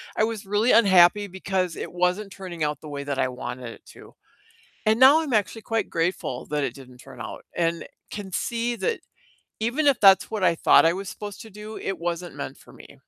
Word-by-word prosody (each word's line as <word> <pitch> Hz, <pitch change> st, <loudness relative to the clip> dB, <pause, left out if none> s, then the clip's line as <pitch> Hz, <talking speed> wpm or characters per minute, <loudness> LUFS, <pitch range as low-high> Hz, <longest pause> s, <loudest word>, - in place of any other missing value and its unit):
I 215 Hz, -, +2 dB
was 220 Hz, -3 st, -5 dB
really 210 Hz, +4 st, +2 dB
unhappy, 200 Hz, -1 st, +5 dB
because 185 Hz, -2 st, -2 dB
it -, -, -6 dB
wasn't 180 Hz, +3 st, 0 dB
turning 175 Hz, -5 st, -6 dB
out 150 Hz, -1 st, -3 dB
the 155 Hz, -, -9 dB
way 140 Hz, -1 st, -5 dB
that 140 Hz, -2 st, -3 dB
I -, -, +2 dB
wanted 125 Hz, -1 st, -6 dB
it -, -, -18 dB
to, -, -, -15 dB, 0.7 s
and 220 Hz, +2 st, +3 dB
now 280 Hz, +5 st, +7 dB
I'm 285 Hz, -6 st, -3 dB
actually 215 Hz, +1 st, 0 dB
quite 225 Hz, -2 st, -1 dB
grateful 165 Hz, -6 st, -2 dB
that 150 Hz, -1 st, -1 dB
it -, -, -2 dB
didn't 130 Hz, -2 st, -14 dB
turn -, -, -12 dB
out, -, -, -8 dB
and 170 Hz, -1 st, -1 dB, 0.2 s
can 200 Hz, -2 st, -7 dB
see 235 Hz, 0 st, -1 dB
that 465 Hz, -1 st, -1 dB, 0.6 s
even 255 Hz, +7 st, 0 dB
if 270 Hz, -, +3 dB
that's 195 Hz, 0 st, +6 dB
what 215 Hz, -3 st, -3 dB
I 170 Hz, -, +4 dB
thought 165 Hz, -, +5 dB
I 165 Hz, -, +4 dB
was 195 Hz, -1 st, -6 dB
supposed 205 Hz, -1 st, -8 dB
to 220 Hz, -, -13 dB
do, 210 Hz, +2 st, -9 dB
it 195 Hz, -, -4 dB
wasn't 175 Hz, 0 st, -4 dB
meant -, -, -6 dB
for -, -, -17 dB
me. -, -, -15 dB
190 Hz, 215 wpm, -24 LUFS, 165-220 Hz, 0.7 s, now